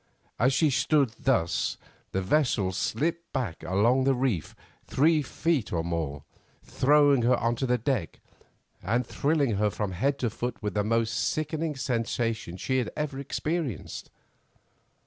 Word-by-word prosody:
As 125 +3 +4
she 150 +2 +3
stood 140 0 +3
thus 115 - 0 0.3
the 95 - -1
vessel 115 -5 +2
slipped 150 - -2
back 120 - -3
along 110 +9 +2
the 135 -1 +3
reef 125 - -1 0.3
three 155 +3 +3
feet 150 -3 -1
or 80 -2 0
more, 80 -5 -3 0.4
throwing 145 -1 +4
her 120 +1 +3 0.2
to 130 +3 -2
the 125 0 +2
deck, 120 - -2 0.6
and 120 +3 0
thrilling 140 -5 +1
her 105 +1 +2
from 105 -1 -3
head 135 +10 0
to 120 -5 -1
foot 120 +2 -4
with 105 -3 -3
the 105 - +1
most 115 +1 +1
sickening 155 0 -1
sensation 115 - -2
she 130 +7 0
had 120 - -2
ever 150 -3 -2
experienced. 140 - -3
125 Hz, 145 wpm, -27 LUFS, 105-140 Hz, 0.6 s, As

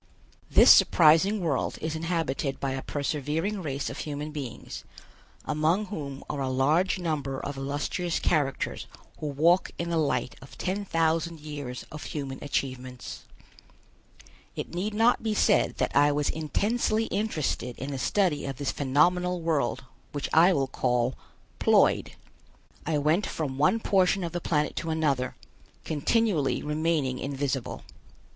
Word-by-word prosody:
This - - +8
surprising 175 +6 +5
world 155 -7 -1
is 160 0 -3
inhabited 160 -4 -2
by 135 - -1
a 135 0 -3
persevering 150 +9 -2
race 140 -4 -3
of - - -5
human 150 0 -4
beings, 140 -6 -7 0.6
among 155 +7 +1
whom 140 -6 -6
are 140 - -3
a 135 - -1
large 150 +10 +2
number 145 -6 -2
of 145 - -5
illustrious 145 +5 -2
characters 145 -5 -1 0.3
who 155 - -3
walk 165 +6 +3
in 170 0 -3
the 165 - +1
light 140 -4 0
of 135 - -13
ten 195 +2 -2
thousand 165 -1 0
years 145 -4 -6
of 150 - -7
human 135 -3 -5
achievements. 130 -3 -4 1.3
It - - -5
need 200 +5 -2
not 230 +3 +4
be 220 -1 -1
said - - +3
that - - -1
I 145 +1 +5
was 145 0 0
intensely 215 +8 0
interested 155 - -2
in 135 +2 -5
the 135 - -4
study 175 -1 +1
of 135 -2 -5
this 140 0 -1
phenomenal 180 +6 +2
world 160 -5 0 0.3
which 145 -1 -3
I 170 +4 +7
will 140 -6 +2
call 125 -1 0 0.5
Ploid. - - +3 0.7
I 155 -2 +1
went 155 +7 +2
from 140 -4 -4
one 185 +9 +3
portion 190 -2 +2
of 170 - -3
the 175 - -3
planet 150 -2 0
to 165 - -3
another, 145 -6 0 0.5
continually 160 0 +1
remaining 150 -4 0
invisible. 135 -2 -3
150 Hz, 145 wpm, -27 LUFS, 140-175 Hz, 1.3 s, This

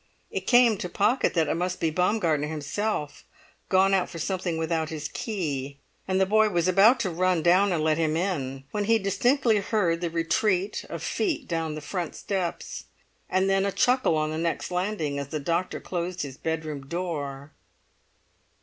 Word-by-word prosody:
It - - -4
came 240 -4 +5
to 180 - -4
Pocket 230 +6 +1
that 160 -2 +2
it - - +1
must 180 +2 -2
be 160 - +1
Baumgartner 170 -4 +1
himself, 155 +2 -3 0.5
gone 190 +1 +4
out 190 -2 +2
for 170 - -8
something 175 0 -2
without 160 -1 -1
his 155 -2 -4
key; 145 - -4 0.3
and 190 0 +1
the 190 - +4
boy 215 +2 +4
was 175 -3 +1
about 200 +7 +6
to 190 - -1
run 180 -1 +1
down 185 +3 +4
and 165 -3 0
let 155 0 +2
him 160 -1 +1
in, 135 -8 -2
when 210 -1 -1
he 225 +2 +4
distinctly 220 +4 +2
heard 190 -5 0
the 170 - -1
retreat 180 +4 0
of - - -6
feet 360 -7 -1
down 165 -2 -2
the 155 - -6
front 175 +2 -4
steps, 190 -4 -4 0.4
and 190 +1 +2
then 195 0 +2
a 200 - 0
chuckle 250 -7 +2
on 155 0 0
the 155 - -3
next 170 +2 -2
landing 180 -6 -1
as 140 - -4
the 155 +2 -4
doctor 170 +5 -1
closed 180 -1 -3
his 135 -3 -7
bedroom 155 -4 -4
door. 145 -4 -4
175 Hz, 180 wpm, -26 LUFS, 155-195 Hz, 0.5 s, about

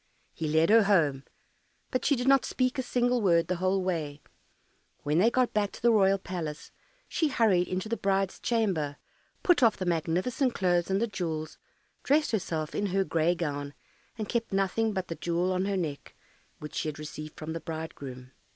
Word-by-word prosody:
He 160 - -3
led 160 +4 +3
her 225 -1 +6
home, 150 -9 +2 0.7
but 255 -2 -1
she 285 - +4
did 250 +1 -3
not 275 -1 +5
speak 255 0 -1
a - - +2
single 245 -1 +1
word 170 -4 +3
the 180 - -1
whole 185 +1 +1
way. 155 -6 -3 0.8
When 150 +3 +1
they 220 +5 +5
got 250 0 +1
back 205 -1 +1
to - - -11
the 235 - +6
royal 195 -3 +4
palace, 170 -5 -6 0.4
she 320 - 0
hurried 210 -10 +2
into 185 +3 -3
the 230 - -1
bride's 195 -1 0
chamber, 190 -12 0 0.5
put 355 -6 +4
off 230 -4 +4
the 185 - -3
magnificent 180 - 0
clothes 175 -2 +1
and 190 +1 +1
the 230 - +2
jewels, 165 -7 -4 0.4
dressed 300 +2 +2
herself 165 -7 -2
in 205 - -1
her 195 +1 +1
gray 170 -1 +1
gown, 145 -4 -4 0.4
and 215 -2 -4
kept 230 0 -2
nothing 195 +3 +1
but 190 -3 -3
the - - -3
jewel 170 +3 -1
on 185 +1 0
her 200 -1 0
neck, 155 -6 -4 0.4
which 150 - -9
she - - -2
had 150 - -4
received 155 0 -8
from 160 +1 -5
the 165 - -4
bridegroom. 140 -6 -7
185 Hz, 190 wpm, -28 LUFS, 160-220 Hz, 0.8 s, her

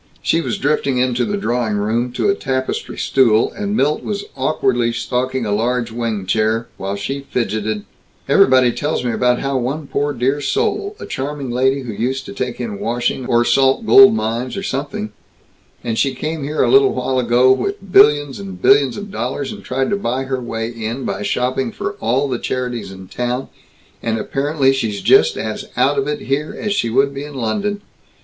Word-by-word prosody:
She 165 - +2
was - - -2
drifting 140 -2 0
into 125 -1 +1
the 205 - -2
drawing 120 - -1
room, 115 +4 0
to - - 0
a 200 - +4
tapestry 130 -8 -3
stool, 115 -4 +3
and 205 +1 -3
Milt 150 -2 +1
was 200 -1 -3
awkwardly 130 -4 +1
stalking 125 +1 -2
a 105 - -2
large 115 +2 0
wing 115 -4 -3
chair, 110 +4 +1
while 100 +1 -3
she 135 +8 -5
fidgeted: 110 -3 -2 0.4
"Everybody 130 -2 +5
tells 145 +1 -2
me 120 - +1
about 125 +1 +1
how 135 -1 -1
one 140 +5 -3
poor 145 +1 -1
dear 135 +3 0
soul, 400 - -1
a - - -7
charming 140 -1 -4
lady 130 +3 +1
who 120 -4 -6
used 130 +5 -2
to - - -8
take 125 -1 -4
in 110 -5 -4
washing 120 +2 -1
or 120 0 +3
salt 135 - +3
gold 200 +1 +8
mines 120 - -2
or 195 - -4
something, 135 - -3 0.7
and 115 -2 -2
she 135 -2 +1
came 155 +3 -4
here 150 +2 0
a - - +2
little 405 0 +5
while 130 -1 0
ago 125 +1 +4
with 195 +8 -2
billions 150 -8 +5
and 195 -2 -8
billions 405 - +4
of 205 0 -7
dollars, 135 -3 -3
and - - -9
tried 130 +1 -1
to - - +3
buy 130 -8 -2
her 130 -1 -3
way 115 -2 -3
in 115 +2 -5
by - - -3
shopping 125 +4 -1
for - - -4
all 130 +5 +1
the 125 -3 -2
charities 125 -5 -3
in 95 -1 -11
town, 125 +4 -3 0.5
and 115 -1 -1
apparently 135 +3 +1
she's 110 -6 -2
just 435 +4 +5
as - - -4
out - - +3
of 410 - -1
it 445 0 -2
here 145 +3 -2
as 210 -2 -1
she 115 - 0
would 135 +4 +2
be 140 +1 -5
in 145 -1 -9
London. 205 - -2
130 Hz, 195 wpm, -18 LUFS, 120-145 Hz, 0.7 s, gold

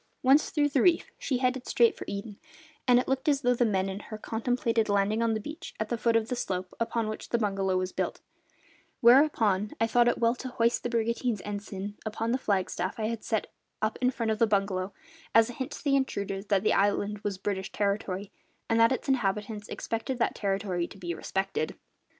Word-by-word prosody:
Once 270 +4 +5
through 295 -1 +2
the 280 -3 +1
reef, 345 -2 +3
she 260 - 0
headed 255 0 0
straight 235 -2 +4
for - - -8
Eden, 200 +1 -6 0.5
and 245 -1 +6
it 250 - +1
looked 265 +3 +1
as 280 -2 +2
though 245 -2 +3
the 245 - +2
men 190 -2 +1
in 195 +1 -4
her 215 +1 -8
contemplated 230 0 0
landing 205 +2 +2
on 230 -1 +2
the - - -1
beach 310 +9 -8
at 215 0 -2
the 235 - -1
foot 230 0 +2
of 225 -1 +2
the 250 - -2
slope 185 -5 -3
upon 230 -1 0
which 215 - -6
the 235 - +2
bungalow 195 -4 0
was 185 0 -1
built; - - -2 0.8
whereupon 230 -6 +4
I 225 - +4
thought 240 +1 +3
it 240 - +2
well 230 0 +3
to 260 - -6
hoist 235 -2 +1
the 245 - -2
brigantine's 235 -1 0
ensign 205 0 -5
upon 220 +1 -2
the 255 - +1
flagstaff 190 -3 -1
I 215 0 0
had 230 -1 -4
set 220 -2 0 0.3
up 215 +1 -1
in 250 - +4
front 230 -3 -1
of 215 - -1
the 230 - +5
bungalow, 195 -2 0 0.4
as 225 +1 +6
a - - -10
hint 260 +3 -4
to - - -9
the 280 -2 +3
intruders 200 -7 -2
that 200 -2 +2
the - - +3
island 205 +1 +1
was 200 -2 -3
British 190 0 -3
territory, 200 -1 -2 0.4
and 225 0 +2
that 230 +2 +6
its 260 - -2
inhabitants 210 -4 -1
expected 230 +3 -3
that 235 - +1
territory 195 -3 -1
to - - -13
be 175 -3 -4
respected. 190 -2 -2
220 Hz, 215 wpm, -28 LUFS, 200-245 Hz, 0.8 s, and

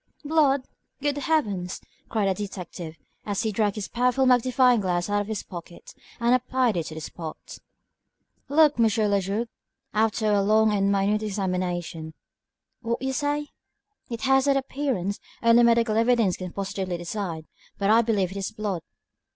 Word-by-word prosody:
"Blood! 285 -3 +3 0.4
Good 290 0 -1
Heavens!" 205 - -1 0.3
cried 215 -3 0
the 190 - +2
detective, 180 -4 -7 0.3
as 205 +1 -2
he 220 - 0
dragged 205 -1 0
his 210 -3 -4
powerful 250 +2 +1
magnifying 250 -1 +4
glass 180 0 -1
out 205 0 +2
of 205 - -5
his 215 -2 -3
pocket 175 -1 -10 0.3
and 235 +1 +3
applied 255 -2 +1
it 165 -2 -2
to 155 - -7
the 160 - -6
spot. 160 0 -8 0.9
"Look, 300 -1 +4
M. 230 - +5
le - - +4 0.3
Juge," - - -6
he 195 - -4
added, 230 +3 -1 0.4
after 215 0 +1
a 200 - +3
long 215 +2 +4
and 200 -1 +2
minute 200 +2 +1
examination. 180 -5 -3 0.7
"What 235 +2 -2
say 290 +2 0
you?" 295 - -10 0.6
"It 230 -2 -5
has 270 +1 +3
that 280 -1 +3
appearance. 260 -8 -2 0.2
Only 230 +1 +6
medical 230 -2 +3
evidence 230 -4 +3
can 180 -1 -6
positively 190 -2 -3
decide, 170 -2 -4 0.3
but 200 +1 +2
I 225 +1 +6
believe 205 -6 0
it 195 - -7
is 195 +1 -3
blood." 210 -5 -3
215 Hz, 165 wpm, -25 LUFS, 190-245 Hz, 0.9 s, Only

